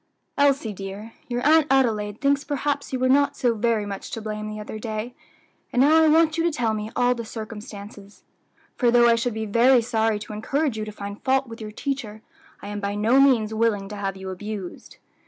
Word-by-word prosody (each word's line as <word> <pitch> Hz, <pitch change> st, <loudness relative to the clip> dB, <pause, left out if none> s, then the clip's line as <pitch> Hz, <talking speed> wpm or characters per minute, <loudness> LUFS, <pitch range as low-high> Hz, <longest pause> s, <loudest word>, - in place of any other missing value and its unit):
"Elsie, 280 Hz, -6 st, +2 dB
dear, 195 Hz, +3 st, -8 dB
your 245 Hz, 0 st, -3 dB
Aunt 310 Hz, 0 st, +5 dB
Adelaide 220 Hz, -6 st, +1 dB
thinks 280 Hz, 0 st, +2 dB
perhaps 285 Hz, 0 st, -2 dB
you 260 Hz, -, -1 dB
were 255 Hz, 0 st, +1 dB
not 280 Hz, +2 st, +3 dB
so 245 Hz, -3 st, +2 dB
very 225 Hz, -1 st, 0 dB
much 200 Hz, -1 st, -6 dB
to -, -, -5 dB
blame 215 Hz, -1 st, -5 dB
the 215 Hz, 0 st, -6 dB
other 210 Hz, +1 st, -7 dB
day; 220 Hz, +2 st, -4 dB, 0.6 s
and 245 Hz, -, 0 dB
now 315 Hz, +3 st, +5 dB
I -, -, +5 dB
want 320 Hz, +1 st, +3 dB
you -, -, +2 dB
to 340 Hz, -, +3 dB
tell 235 Hz, -7 st, 0 dB
me 215 Hz, 0 st, -4 dB
all 245 Hz, 0 st, +3 dB
the 235 Hz, -1 st, -6 dB
circumstances; 210 Hz, -2 st, -9 dB, 0.5 s
for 245 Hz, -, +2 dB
though 240 Hz, 0 st, +5 dB
I 235 Hz, -, +6 dB
should 230 Hz, 0 st, -1 dB
be 220 Hz, 0 st, -3 dB
very 235 Hz, +3 st, +4 dB
sorry 225 Hz, -2 st, +1 dB
to 210 Hz, +1 st, -8 dB
encourage 275 Hz, +5 st, -1 dB
you 215 Hz, -1 st, -3 dB
to 215 Hz, -, -7 dB
find 200 Hz, 0 st, -8 dB
fault 265 Hz, 0 st, +2 dB
with 230 Hz, 0 st, -10 dB
your 215 Hz, -, -6 dB
teacher, 220 Hz, -3 st, -5 dB, 0.4 s
I 205 Hz, -, -6 dB
am 205 Hz, 0 st, -4 dB
by 200 Hz, 0 st, -3 dB
no 225 Hz, +6 st, +3 dB
means 240 Hz, -6 st, +4 dB
willing 215 Hz, -3 st, 0 dB
to 210 Hz, -, -6 dB
have 195 Hz, -2 st, -3 dB
you 190 Hz, 0 st, -6 dB
abused." 200 Hz, -1 st, -7 dB
225 Hz, 215 wpm, -24 LUFS, 210-265 Hz, 0.6 s, I